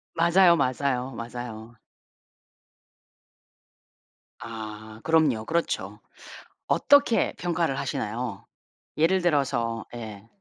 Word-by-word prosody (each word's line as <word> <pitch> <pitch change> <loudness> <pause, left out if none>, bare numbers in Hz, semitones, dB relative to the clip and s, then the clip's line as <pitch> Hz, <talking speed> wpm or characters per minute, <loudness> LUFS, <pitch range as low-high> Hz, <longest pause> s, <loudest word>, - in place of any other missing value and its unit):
맞아요, 170 +1 +5
맞아요, 130 -2 0
맞아요. 115 -1 -7 2.6
아 110 -1 -8
그럼요. 150 -9 +2
그렇죠. 170 +4 -2 0.7
어떻게 285 -5 +4
평가를 170 -5 -1
하시나요? 115 -6 -4 0.5
예를 175 +5 +3
들어서. 130 -9 0
예. 110 -3 -8
125 Hz, 185 characters per minute, -26 LUFS, 115-165 Hz, 2.6 s, 맞아요